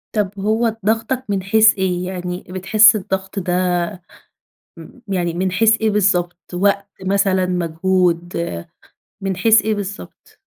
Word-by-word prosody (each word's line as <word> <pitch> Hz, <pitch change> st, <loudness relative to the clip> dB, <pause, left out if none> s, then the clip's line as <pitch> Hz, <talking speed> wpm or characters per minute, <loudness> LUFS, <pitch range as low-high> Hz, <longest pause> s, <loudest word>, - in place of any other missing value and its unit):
طَب 200 Hz, -1 st, -2 dB
هو 220 Hz, +2 st, 0 dB
ضاغطك 225 Hz, +4 st, 0 dB
من 195 Hz, -2 st, -1 dB
حيث 220 Hz, +3 st, +5 dB
إيه، 180 Hz, -2 st, -1 dB
يعني 180 Hz, -1 st, -5 dB
بتحس 205 Hz, +4 st, +5 dB
الضغط 190 Hz, 0 st, -4 dB
ده 175 Hz, -1 st, -2 dB, 1.2 s
م -, -, -13 dB
يعني 175 Hz, -3 st, -1 dB
من 185 Hz, +2 st, -1 dB
حيث 225 Hz, +4 st, +3 dB
إيه 220 Hz, -, +2 dB
بالضبط، 180 Hz, -4 st, 0 dB
وقت 200 Hz, +2 st, +1 dB, 0.2 s
مثلًا، 190 Hz, -1 st, +1 dB
مجهود 175 Hz, 0 st, -1 dB, 0.8 s
من 195 Hz, -1 st, -2 dB
حيث 220 Hz, +3 st, +5 dB
إيه 220 Hz, 0 st, -1 dB
بالضبط؟ 200 Hz, 0 st, -8 dB
190 Hz, 130 wpm, -19 LUFS, 180-210 Hz, 1.2 s, حيث